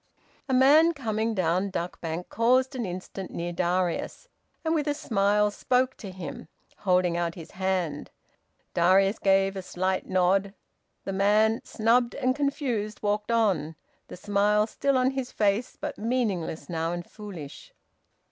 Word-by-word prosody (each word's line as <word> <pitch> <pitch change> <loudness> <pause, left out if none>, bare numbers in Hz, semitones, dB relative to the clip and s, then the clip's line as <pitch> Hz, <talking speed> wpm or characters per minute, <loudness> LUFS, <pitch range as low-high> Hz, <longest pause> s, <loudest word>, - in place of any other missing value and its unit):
A - - +1
man 305 +6 +6
coming 225 -4 -1
down 185 +1 +1
Duck 180 -2 -4
Bank 165 +1 -4
paused 255 +4 +2
an 240 -5 -2
instant 185 +1 -6
near 175 +1 -4
Darius, 180 - -1 0.4
and 320 - +2
with 305 -2 0
a 290 - +1
smile 210 -4 +2
spoke 255 +4 +1
to 200 - -8
him, 180 -5 -8 0.3
holding 180 -3 +2
out 170 -1 -1
his 165 -3 -10
hand. 185 -5 -2 0.6
Darius 195 +4 +3
gave 195 0 +3
a 190 - -4
slight 185 +1 -2
nod. 190 +2 +2 0.5
The 195 - -4
man, 210 +3 +3
snubbed 235 +2 +1
and 255 -1 +1
confused, 255 -8 -2
walked 210 +2 0
on, 195 -9 +1 0.3
the - - -9
smile 205 +2 +2
still 275 +4 0
on 255 +1 +2
his 265 -2 -4
face, 210 +3 0
but - - -5
meaningless 215 -8 -1
now, 165 -1 -2
and 175 0 -5
foolish. 185 -10 -10
200 Hz, 145 wpm, -27 LUFS, 180-235 Hz, 0.6 s, man